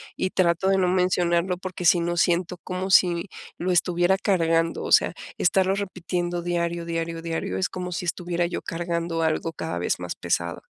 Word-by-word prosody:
y 185 - -1
trato 175 0 +2
de 195 - +3
no 185 -1 +2
mencionarlo, 180 -1 +1
porque 180 -1 -6
si 175 +1 +6
no 175 +1 -1
siento 175 +1 +1
como 185 +1 -4
si 175 -2 +4 0.3
lo 180 +1 -1
estuviera 175 +1 +2
cargando. 165 -3 +1
O - - -5
sea, - - +5 0.2
estarlo 190 +2 +2
repitiendo 175 -3 -3
diario, 170 -1 -1
diario, 165 0 -3
diario 165 - -3
es 95 - 0
como 180 -1 -5
si 180 - -3
estuviera 175 0 -1
yo 170 - -3
cargando 170 -1 -2
algo 160 +1 0
cada 160 - -4
vez 90 - -1
más 90 -1 -5
pesado. 85 0 -2
175 Hz, 180 wpm, -25 LUFS, 165-180 Hz, 0.3 s, si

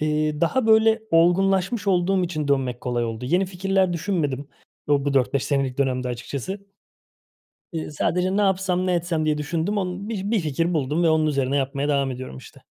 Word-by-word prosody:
Eee, 150 0 0
daha 220 +9 +1
böyle 220 0 +4
olgunlaşmış 190 +5 +2
olduğum 185 0 +2
için 155 -4 -3
dönmek 130 -3 0
kolay 120 -1 -1
oldu. 115 +1 -5
Yeni 180 +8 +1
fikirler 190 0 0
düşünmedim 155 -6 -2 0.4
o 145 -1 +2
bu 145 -1 0
4-5 135 0 +1
senelik 135 -2 -1
dönemde 130 -2 0
açıkçası. 140 - -5 1.1
Eee, 160 -2 -4
sadece, 180 +5 0
"Ne 210 - +3
yapsam, 185 -2 +1
ne 180 - +1
etsem?" 170 -2 -1
diye 150 -1 +1
düşündüm. 165 +7 -1
Onu 185 +2 -4
bi 205 -2 -3
bir 225 -4 +2
fikir 165 +3 -1
buldum 150 +3 0
ve 165 - +4
onun 160 0 +3
üzerine 140 -2 0
yapmaya 140 +1 -1
devam 140 -2 +1
ediyorum, 130 - -7
işte. - - -15
160 Hz, 180 wpm, -23 LUFS, 140-190 Hz, 1.1 s, böyle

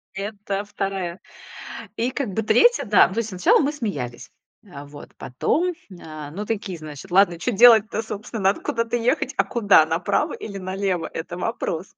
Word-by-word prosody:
Это 200 0 -4
2. 195 -3 -4 0.8
И 245 +3 0
как 265 -5 -3
бы 220 - -1
3, 475 - +4
да, 205 -3 +5
ну 190 - -8
то - - 0
есть 225 -1 -3
сначала 180 -2 +3
мы 290 -1 +1
смеялись, 145 - -5 0.4
а 140 +1 -8
вот, 145 0 -13
потом, 345 - -1 0.3
а, 155 -2 -9
ну 205 +5 -5
такие, 200 -5 -4
значит, 155 +3 -10
ладно, 180 -3 +4
чё 245 - -1
делать-то, 220 0 +6
собственно, 215 0 -6
надо 195 +2 +2
куда-то 230 0 -2
ехать, 245 +2 0
а - - +4
куда 205 -9 +4
направо 180 - 0
или 200 -2 -7
налево? 185 -3 -2
Это 170 +2 -6
вопрос. 195 -4 -3
200 Hz, 170 wpm, -22 LUFS, 175-230 Hz, 0.8 s, делать-то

